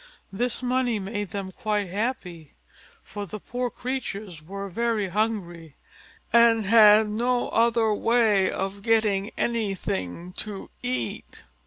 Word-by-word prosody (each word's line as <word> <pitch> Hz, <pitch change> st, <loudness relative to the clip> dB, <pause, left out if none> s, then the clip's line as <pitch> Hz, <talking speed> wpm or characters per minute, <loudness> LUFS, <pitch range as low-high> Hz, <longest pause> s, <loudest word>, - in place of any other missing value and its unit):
This 245 Hz, +4 st, -1 dB
money 250 Hz, -2 st, +1 dB
made 205 Hz, 0 st, -4 dB
them 195 Hz, 0 st, -5 dB
quite 210 Hz, +1 st, -2 dB
happy; 180 Hz, -, -4 dB, 0.5 s
for 205 Hz, -1 st, -7 dB
the 215 Hz, -, -7 dB
poor 245 Hz, +4 st, -3 dB
creatures 215 Hz, -10 st, -5 dB
were 195 Hz, +5 st, -6 dB
very 220 Hz, 0 st, -1 dB
hungry, 175 Hz, -7 st, -2 dB, 0.6 s
and 230 Hz, -2 st, +5 dB
had 215 Hz, 0 st, +7 dB
no 240 Hz, +4 st, 0 dB
other 230 Hz, -1 st, +3 dB
way 215 Hz, -4 st, +3 dB
of 195 Hz, +1 st, -4 dB
getting 215 Hz, -2 st, +2 dB
anything 180 Hz, -, -2 dB
to 205 Hz, -2 st, -6 dB
eat. 125 Hz, -3 st, -4 dB
210 Hz, 120 wpm, -25 LUFS, 190-230 Hz, 0.6 s, had